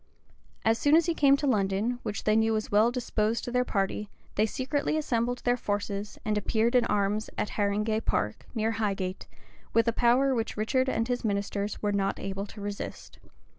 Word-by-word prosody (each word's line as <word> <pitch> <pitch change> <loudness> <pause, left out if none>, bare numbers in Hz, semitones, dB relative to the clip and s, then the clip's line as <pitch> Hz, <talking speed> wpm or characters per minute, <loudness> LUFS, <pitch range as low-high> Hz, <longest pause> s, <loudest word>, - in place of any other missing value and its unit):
As 225 +1 +3
soon 290 +1 +4
as 330 0 +5
he 340 - +1
came 280 -3 +5
to 290 - -2
London, 215 0 +1
which 210 -2 -4
they 215 - +3
knew 225 0 +3
was 215 -1 -2
well 215 +3 +5
disposed 230 -2 -1
to 245 - -4
their 250 0 +2
party, 200 -2 -2 0.2
they 215 +2 +2
secretly 285 +6 -1
assembled 245 -4 -1
their 245 0 +3
forces, 205 -2 -3
and 210 -1 +1
appeared 225 +3 +1
in 250 -1 +4
arms 210 +1 0
at - - -1
Haringay 210 +1 0
Park, 105 +1 -2
near 220 0 +1
Highgate, 195 -4 -2 0.5
with 230 +1 +4
a 230 - +3
power 250 +4 +3
which 225 -3 -2
Richard 255 +5 +1
and 230 -2 0
his 245 0 -1
ministers 200 0 -2
were 205 - +2
not 195 -1 0
able 195 +1 -4
to 210 - -11
resist. 205 0 -6
220 Hz, 190 wpm, -28 LUFS, 205-245 Hz, 0.5 s, as